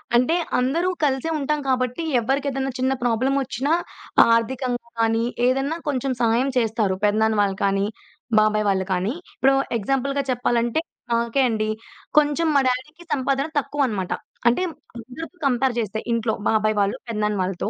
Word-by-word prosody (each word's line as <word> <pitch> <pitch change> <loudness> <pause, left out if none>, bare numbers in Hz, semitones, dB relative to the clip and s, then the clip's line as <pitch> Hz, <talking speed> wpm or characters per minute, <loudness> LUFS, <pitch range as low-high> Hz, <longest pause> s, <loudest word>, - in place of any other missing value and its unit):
అంటే 250 +8 +3 0.2
అందరూ 320 +9 +1
కలిసే 270 +2 +1
ఉంటాం 300 +1 0
కాబట్టి 255 +3 0 0.2
ఎవరికేదైనా 270 +2 -1
చిన్న 260 +1 +2
ప్రాబ్లమొచ్చినా 265 +3 0 0.6
ఆర్థికంగా 245 +1 -1
కానీ 225 0 +2 0.2
ఏదన్నా 270 +5 0
కొంచెం 270 -1 0
సహాయం 235 +4 +2
చేస్తారు. 220 -4 +1
పెదనాన్న 220 +1 +3
వాళ్ళు 195 -1 0
కానీ, 195 0 +1 0.5
బాబాయ్ 215 0 +2
వాళ్ళు 190 -1 +1
కానీ. 185 +6 0 0.2
ఇప్పుడు 270 +2 +4 0.2
ఎగ్జాంపుల్‌గా 275 +5 0
చెప్పాలంటే 240 +2 +1 0.3
నాకే 235 +3 +1
అండి. 215 -1 -1 0.5
కొంచెం 300 +2 +4
మా - - +6
డ్యాడీకి 300 +7 -3
సంపాదన 275 +1 0
తక్కువనమాట. 255 -11 -1 0.4
అంటే 245 +10 +3 0.4
అందరితో 260 +10 -9
కంపేర్ 255 0 +1
చేస్తే 220 0 -2
ఇంట్లో 230 -1 +1 0.2
బాబాయ్ 215 0 +2
వాళ్ళు 200 +6 0
పెదనాన్న 210 -2 -1
వాళ్ళతో. 185 +2 -2
245 Hz, 130 wpm, -23 LUFS, 220-275 Hz, 0.6 s, మా